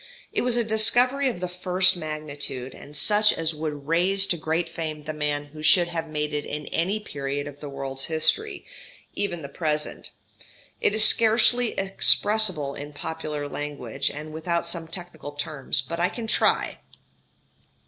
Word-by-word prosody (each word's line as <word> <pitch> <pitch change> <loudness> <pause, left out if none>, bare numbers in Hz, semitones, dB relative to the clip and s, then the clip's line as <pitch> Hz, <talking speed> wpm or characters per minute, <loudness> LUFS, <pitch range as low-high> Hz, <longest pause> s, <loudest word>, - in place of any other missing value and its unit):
It - - +1
was 245 -1 +1
a 240 - +2
discovery 245 +5 +4
of 205 -8 -6
the 180 - -1
first 180 +1 +2
magnitude, 150 -5 -5
and 145 +1 -8
such 210 +7 +4
as 165 0 -1
would 150 -2 -5
raise 185 +4 +4
to 180 - +1
great 165 +1 -1
fame 160 -2 -5
the 155 - -5
man 145 -1 -2
who 155 - -9
should 175 +2 +5
have 165 -1 -4
made 150 -1 -3
it 145 0 -1
in 150 0 -5
any 190 +6 0
period 140 -6 -4
of 145 0 -9
the 145 - -7
world's 135 -1 -3
history, 395 - +4 0.5
even 175 -5 -3
the - - -5
present. 150 0 -3 0.7
It 205 - +1
is 215 0 +6
scarcely 230 +2 +3
expressible 195 -5 +2
in 145 +1 -8
popular 150 -1 -4
language, 140 -2 -4
and 155 +1 -8
without 170 +2 -1
some 170 -1 -3
technical 165 -4 -8
terms; 145 -1 -2
but 170 0 -5
I 175 +1 +2
can 235 - -6
try. 220 - +1
160 Hz, 165 wpm, -25 LUFS, 150-190 Hz, 0.7 s, is